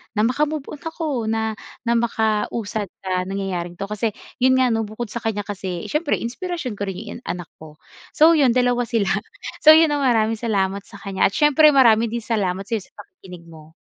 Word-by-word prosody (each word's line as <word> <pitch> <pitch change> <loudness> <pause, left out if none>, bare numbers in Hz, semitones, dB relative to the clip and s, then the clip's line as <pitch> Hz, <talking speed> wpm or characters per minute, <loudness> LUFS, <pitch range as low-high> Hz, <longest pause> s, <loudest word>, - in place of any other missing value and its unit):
na 210 - +2
maka 255 +6 +1
move-on 300 -1 -6
ako, 310 -8 -3
na 220 0 -1 0.3
na 235 -1 +1
makausad 220 -2 -1 0.2
sa 185 -1 -1
nangyayaring 185 -3 -4
ito." 195 +3 -6
Kasi, 210 0 -2 0.2
yun 260 +1 +4
nga, 255 -1 +3
'no, 225 -1 -1
bukod 215 +1 -6
sa 235 - -4
kanya 220 -3 -2
kasi 190 -4 -5
siyempre 300 0 +1
inspirasyon 290 - -4
ko 200 - -2
rin 190 - -4 0.2
yung - - -27
anak 175 -2 -5
ko. 155 -1 -12 0.4
So, 315 +2 +7
yun 275 -7 +3
2 245 -1 +2
sila. 205 -4 0 0.5
So, 310 0 +8
yun, 320 -1 +5
ah, 290 - 0
maraming 225 -4 +2
salamat 200 -4 -1
sa 220 - -14
kanya 195 -1 +1
at 195 - -7
siyempre 300 0 +5
marami 230 -4 +5
din 230 +1 -4
salamat 195 -5 -1
sa'yo 220 +2 -2
sa - - -35
pakikinig 180 -2 -13
mo. 160 -1 -15
225 Hz, 195 wpm, -21 LUFS, 195-255 Hz, 0.5 s, So